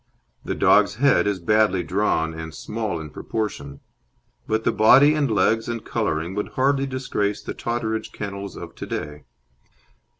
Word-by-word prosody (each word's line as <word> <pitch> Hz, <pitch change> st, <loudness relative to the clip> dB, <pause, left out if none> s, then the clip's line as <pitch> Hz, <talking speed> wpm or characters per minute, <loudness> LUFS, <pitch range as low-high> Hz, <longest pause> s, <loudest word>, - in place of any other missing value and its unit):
The -, -, -3 dB
dog's 100 Hz, -, +4 dB
head 135 Hz, -2 st, +3 dB
is 100 Hz, -2 st, 0 dB
badly 100 Hz, 0 st, +2 dB
drawn 85 Hz, -4 st, 0 dB
and 80 Hz, 0 st, -7 dB
small 105 Hz, -6 st, -4 dB
in 75 Hz, -2 st, -8 dB
proportion; 70 Hz, -12 st, -5 dB, 0.7 s
but 110 Hz, 0 st, 0 dB
the -, -, +2 dB
body 135 Hz, +7 st, +6 dB
and 150 Hz, -3 st, +1 dB
legs 110 Hz, +2 st, +2 dB
and 115 Hz, -2 st, -4 dB
colouring 80 Hz, +4 st, -2 dB
would 105 Hz, +1 st, -4 dB
hardly 135 Hz, +1 st, +2 dB
disgrace 125 Hz, -6 st, -2 dB
the -, -, -5 dB
Totteridge 115 Hz, -2 st, -3 dB
Kennels 100 Hz, -1 st, -6 dB
of -, -, -8 dB
to -, -, -8 dB
day. 75 Hz, -1 st, -5 dB
105 Hz, 155 wpm, -23 LUFS, 90-115 Hz, 0.7 s, body